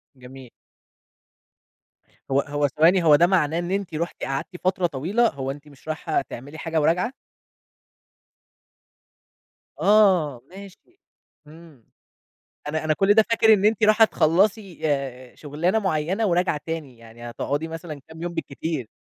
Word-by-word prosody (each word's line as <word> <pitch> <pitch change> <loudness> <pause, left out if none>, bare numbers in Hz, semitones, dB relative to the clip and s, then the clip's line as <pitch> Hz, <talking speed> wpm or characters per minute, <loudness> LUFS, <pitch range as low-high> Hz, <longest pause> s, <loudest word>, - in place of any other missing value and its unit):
جميل. 130 0 -13 1.8
هو 135 - +3
هو 145 0 -1
ثواني، 170 +6 +3
هو 150 -2 +6
ده 175 +3 +4
معناه 170 -3 +1
إن 175 +1 -4
أنتِ 195 -5 -3
رُحتِ 170 +3 -4
قعدتِ 135 0 -3 0.2
فترة 185 -1 +1
طويلة، 180 - 0
هو 135 -1 -5
أنتِ 145 +2 -11
مش 140 +1 -19
رايحة 155 0 -1
تعملي 145 +6 -10
حاجة 160 -1 -1
وراجعة؟ 180 - +1 2.7
آه، 185 - +3
ماشي. 200 - -14 0.5
إمم. 155 -5 -16 0.8
أنا 155 +1 -2
أنا 155 0 +1
كل 195 +5 +3
ده 220 0 +5
فاكر 220 -1 +5
إن 205 -1 +2
أنتِ 220 +1 +2
راحة 215 +1 +6
تخلّصي 190 +3 +1
آآ 130 -4 -3
شُغلانة 165 +8 -1
معيّنة 190 +3 -1
وراجعة 175 -4 +1
تاني، 155 -7 -6
يعني 115 +1 -11
هتقعدي 145 +6 -3
مثلًا 160 -2 -8
كام 160 +1 -11
يوم 175 0 -4
بالكتير. 155 -5 -4
160 Hz, 135 wpm, -23 LUFS, 145-190 Hz, 2.7 s, هو